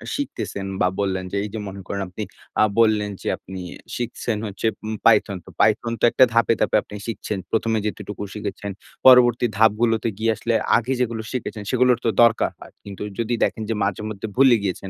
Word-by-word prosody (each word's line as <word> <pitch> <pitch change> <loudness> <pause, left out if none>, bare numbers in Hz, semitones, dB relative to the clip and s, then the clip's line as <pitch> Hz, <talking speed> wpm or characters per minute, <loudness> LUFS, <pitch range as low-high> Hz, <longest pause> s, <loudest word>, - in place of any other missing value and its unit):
শিখতেছেন 265 - -4 0.2
বা - - +4
বললেন 95 -2 -1
যে 100 - -2
এই 105 - -4
যে 110 - -3
মনে 100 0 -7
করেন 100 - -3
আপনি 105 +4 -5 0.4
আ - - +7 0.2
বললেন 110 -2 +3
যে - - -6
আপনি 95 0 -9 0.4
শিখছেন 120 -2 -3
হচ্ছে 100 +3 -2 0.2
উম 110 - -2
Python। 105 -4 +4
তো - - -13
Python 115 +2 +2
তো - - -12
একটা 130 - +5
ধাপে, 115 0 +4
ধাপে - - +2
আপনি 105 - -11
শিখছেন। 110 -2 -4
১ম 115 0 +1
এ - - +1
যতটুকু 105 -1 -5
শিখেছেন, 105 -1 -5 0.4
পরবর্তী 125 -2 +7
ধাপগুলোতে 110 +1 +3
গিয়ে 115 +1 +2
আসলে 115 +2 -2 0.2
আগে 120 +3 -1
যেগুলো 115 -2 -1
শিখেছেন 115 -4 -4
সেগুলোর 125 -1 +4
তো 115 - +4
দরকার 115 -1 +3
হয়। - - -13
কিন্তু 100 -2 -9 0.2
যদি 115 +1 -1
দেখেন 110 - -1
যে 115 - +1
মাঝে 100 0 -1
মধ্যে 110 +1 -5
ভুলে 130 -2 +6
গিয়েছেন 95 0 -3
110 Hz, 195 wpm, -22 LUFS, 100-115 Hz, 0.4 s, আ